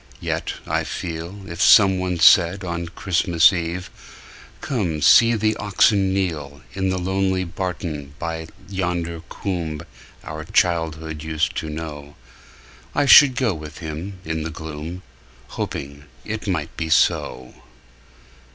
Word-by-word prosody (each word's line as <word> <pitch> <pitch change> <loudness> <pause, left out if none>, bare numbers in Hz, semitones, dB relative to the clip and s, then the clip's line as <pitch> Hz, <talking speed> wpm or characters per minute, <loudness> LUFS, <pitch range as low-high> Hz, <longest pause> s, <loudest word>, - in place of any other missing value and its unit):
Yet, - - -3
I - - -1
feel, 85 +4 -6
If 85 -2 -6
someone 95 -3 +5
said 90 +3 +5
on 85 -1 -4
Christmas 85 0 +3
Eve, 85 +1 -4 0.7
"Come; 95 - -2
see 115 0 +6
the 110 0 +1
oxen 100 -1 +2
kneel,"In 90 0 -3
the 95 - -1
lonely 95 0 0
barton 85 -5 -5
by 80 0 -4 0.2
yonder 85 -3 -3
coomb 85 -6 -4 0.4
Our 80 0 -6
childhood 80 -2 0
used 80 0 -1
to 80 - -3
know,"I 75 - -7
should 135 -1 +8
go 120 -4 +1
with 75 -2 -9
him 85 +5 -6
in 80 0 -2
the 80 - -4
gloom, 80 +3 -7 0.5
Hoping 70 +1 -6 0.2
it 110 0 -5
might 80 -6 -2
be 80 -1 -3
so. 65 -4 +1
85 Hz, 120 wpm, -22 LUFS, 80-95 Hz, 0.7 s, should